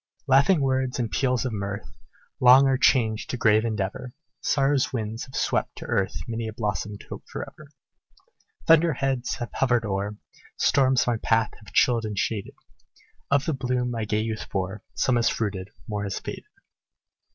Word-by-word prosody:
"Laughing 140 +5 +4
words 130 -1 0
and 120 -3 -2
peals 125 -2 +1
of 125 - -2
mirth, 100 0 -4 0.5
Long 130 +2 +8
are 135 -1 +3
changed 110 -4 +2
to 125 - -2
grave 110 -1 +4
endeavor; 110 +2 -3 0.3
Sorrow's 135 -1 +2
winds 110 -1 -4
have 130 - -13
swept - - 0
to - - -9
earth 95 -3 0
Many 115 -1 -3
a 110 - -5
blossomed 105 -1 -3
hope - - -8
forever. 155 - -8 1.0
Thunder 165 0 +5
heads 135 -2 -1
have 120 - -6
hovered 120 -3 +1
o'er 100 +1 -2 0.4
Storms 130 -2 +3
my 120 -2 +1
path 115 0 +1
have 105 - -14
chilled 120 -3 +3
and 105 -2 -4
shaded; 105 0 -2 0.7
Of 140 0 +2
the 160 - 0
bloom 125 -1 -1
my 115 -2 -2
gay 105 +1 0
youth 110 -1 -4
bore, 95 +2 -3
Some 130 -2 +2
has 115 - +3
fruited 100 -3 -3 0.2
more 105 -1 -3
has 100 -1 -3
faded." - - -7
115 Hz, 165 wpm, -25 LUFS, 105-130 Hz, 1.0 s, Long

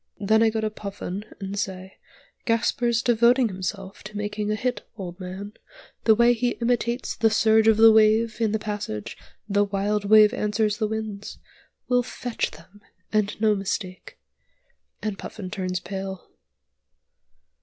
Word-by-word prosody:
Then 215 +2 +3
I 225 - +5
go 220 0 -2
to 215 0 -1
Puffin 200 -1 -6
and 195 0 -4
say, 190 0 -5 0.5
'Gasper's 235 +1 +1
devoting 240 +1 +4
himself 190 +1 -5
to 210 0 -7
making 210 0 -3
a 215 - +1
hit, 250 +3 -2 0.2
old 180 -2 -7
man; 190 +3 -7 0.5
the 220 - +6
way 235 +2 +5
he 240 +1 -1
imitates 240 +1 -1
the 225 - +3
surge 220 0 +4
of 220 -1 +5
the 225 0 +8
wave 220 +1 +4
in 220 -2 +2
the 220 - +1
passage 205 - -5 0.3
'The 205 0 +2
wild 200 +1 -1
wave 215 +1 +7
answers 210 -2 0
the 215 - 0
winds,' 215 -2 -5 0.5
will 250 0 +3
'fetch' 245 -1 -3
them, 170 +6 -17 0.3
and 210 -1 0
no 215 -1 +4
mistake!' 195 -2 -4 0.9
and 210 -2 -3
Puffin 185 -4 -7
turns 185 -3 -2
pale." 190 +1 -7
210 Hz, 150 wpm, -24 LUFS, 195-225 Hz, 0.9 s, the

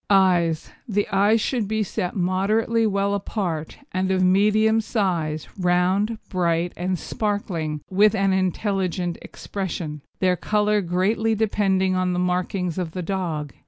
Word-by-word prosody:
EYES 180 -5 +3 0.2
The 205 -2 0
eyes 205 +3 +3
should 230 -2 -1
be 220 +1 0
set 185 -2 -3
moderately 210 +5 +1
well 200 0 0
apart, 185 -6 -3
and 185 0 -1
of 190 -1 +2
medium 215 +4 +4
size, 175 -9 -1
round, 185 +5 +2
bright, 175 -2 0
and 180 +1 -1
sparkling, 175 -8 -3
with 205 +2 +4
an 195 -1 +2
intelligent 185 -2 -1
expression, 170 -6 -5 0.2
their 185 -1 +2
colour 210 +2 +1
greatly 200 +5 +1
depending 195 -3 +1
on 185 0 +1
the - - -1
markings 180 0 -1
of 165 -3 -4
the 180 - -4
dog. 165 -6 -3
190 Hz, 135 wpm, -23 LUFS, 180-205 Hz, 0.2 s, medium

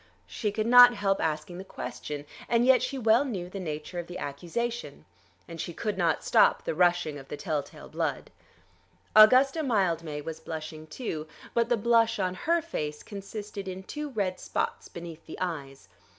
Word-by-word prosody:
She 210 -3 -3
could 215 +1 -1
not 245 +1 +9
help 195 -1 0
asking 160 +3 -2
the - - -6
question, 150 -5 -6 0.2
and 235 0 +3
yet 260 0 +6
she 275 - -2
well 230 +1 +4
knew 190 -10 -5
the 195 - -5
nature 155 0 -5
of 175 - -6
the 180 - -7
accusation. 185 +11 -4 0.4
And 165 -2 -6
she 170 - -6
could 210 -3 -2
not 170 -4 +1
stop - - +4
the - - -1
rushing 175 -3 +2
of 135 - -13
the - - -6
tell 155 -4 -1
tale - - -13
blood. - - -3 0.8
Augusta 255 +8 +7
Mildmay 170 - 0
was 160 +1 -6
blushing 155 -1 -7
too, 155 -4 -5 0.3
but 235 0 +2
the 240 - +3
blush 230 +1 +3
on 185 -2 0
her 330 - 0
face 150 - -4
consisted 200 0 -7
in 190 0 -6
two 300 +8 -5
red 200 -7 -2
spots - - -3
beneath 170 -2 -9
the - - -8
eyes. 145 -7 -5
185 Hz, 180 wpm, -28 LUFS, 160-230 Hz, 0.8 s, not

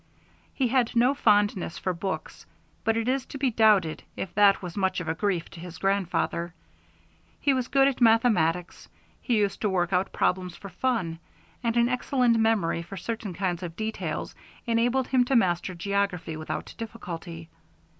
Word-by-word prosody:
He 260 -3 +1
had 250 -1 +1
no 245 +3 +4
fondness 205 -8 +2
for 185 - -2
books, 190 +2 -5 0.4
but 225 0 +1
it 230 +1 -1
is 265 +1 +1
to - - -7
be 265 -2 +1
doubted 210 -8 +3 0.2
if 190 - -5
that 200 -1 +5
was 175 -2 -6
much 190 -2 0
of 170 - -6
a 160 - +1
grief 185 -1 -1
to - - -11
his 175 0 -9
grandfather. 180 -3 -1 0.8
He 280 - +2
was 255 -2 -1
good 275 0 +4
at 270 -2 -1
mathematics, 210 -8 +2 0.3
he 240 -4 +1
used 205 -2 0
to 210 - +1
work 180 -2 0
out 185 +1 +1
problems 180 -1 0
for 200 - -10
fun, 180 -5 -1 0.4
and 230 0 0
an 235 0 +4
excellent 250 -1 +2
memory 215 -7 +2
for 195 +4 -9
certain 210 -1 -4
kinds 180 -2 -1
of 170 -2 -6
details 220 +3 -4 0.3
enabled 245 +2 +1
him 255 -2 +4
to 265 - +1
master 185 -4 +1
geography 195 -3 -1
without 155 0 -5
difficulty. 170 -7 -7
200 Hz, 170 wpm, -27 LUFS, 175-235 Hz, 0.8 s, that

